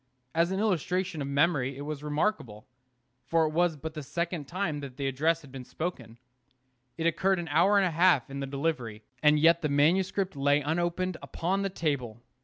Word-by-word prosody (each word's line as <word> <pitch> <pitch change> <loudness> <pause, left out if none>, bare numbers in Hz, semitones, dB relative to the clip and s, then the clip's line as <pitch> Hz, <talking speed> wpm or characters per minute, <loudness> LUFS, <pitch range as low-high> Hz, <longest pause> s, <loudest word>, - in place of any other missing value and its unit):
As 170 +1 +2
an 190 +1 -2
illustration 185 -4 -1
of 140 - -3
memory 140 -2 +1
it - - -7
was 145 0 -5
remarkable, 150 - -2 0.6
for 160 +5 +2
it 155 - -1
was 170 0 +1
but 160 +2 -6
the 155 - -6
second 170 +2 -3
time 170 -4 -2
that 135 -3 -9
the 140 - -3
address 160 +5 +1
had 140 - -14
been 130 -1 -8
spoken. 125 -7 -6 0.8
It 165 - -2
occupied 190 +3 +2
an 170 -1 -4
hour 175 +7 +4
and 195 - +4
a 180 - 0
half 165 -6 +3
in 140 0 -6
the 135 - -3
delivery, 135 -7 -3 0.2
and 150 0 +5
yet 165 +2 +4
the 150 - -1
manuscript 185 +6 +2
lay 145 +1 +3
unopened 175 +3 -1
upon 190 +4 -2
the 195 - -1
table. 140 - -2
160 Hz, 195 wpm, -28 LUFS, 140-175 Hz, 0.8 s, and